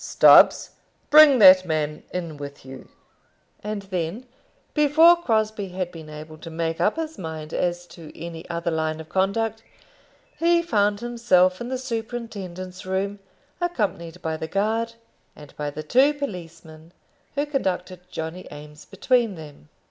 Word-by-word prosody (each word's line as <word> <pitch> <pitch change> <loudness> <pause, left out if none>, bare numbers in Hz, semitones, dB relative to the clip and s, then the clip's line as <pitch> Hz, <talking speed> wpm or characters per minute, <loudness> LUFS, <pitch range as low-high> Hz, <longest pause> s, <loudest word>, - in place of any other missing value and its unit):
"Stubbs, - - +6 0.4
bring 300 -3 +8
that 185 -4 +8
man 155 -3 -2
in 170 -4 -5
with 140 -1 -9
you." 135 0 -11 0.7
And 210 -1 -4
then, 185 +4 -4 0.5
before 315 +3 +6
Crosbie 220 - -1
had 180 -2 -2
been 160 -2 -11
able 155 +1 -10
to 165 - -9
make 165 0 -3
up 210 - +2
his 320 -1 -5
mind 160 -3 -7
as 175 0 -1
to 165 -3 -13
any 165 0 -8
other 170 0 -2
line 160 0 -2
of 160 0 -10
conduct, 220 +4 -1 0.8
he 340 0 +3
found 205 -8 +1
himself 230 -6 +2
in 240 - -4
the 260 - -2
superintendent's 225 -7 -6
room, 195 +2 -2 0.4
accompanied 190 - -3
by 160 -1 -2
the 160 - -5
guard, 220 +5 -1 0.4
and 150 -2 -14
by 150 0 -3
the 155 +2 -7
two 265 - +3
policemen 165 - -8 0.4
who 285 +1 0
conducted 185 - -3
Johnny 165 +1 -6
Eames 150 0 -12
between 230 +1 0
them. 150 - -13
185 Hz, 145 wpm, -23 LUFS, 160-230 Hz, 0.8 s, bring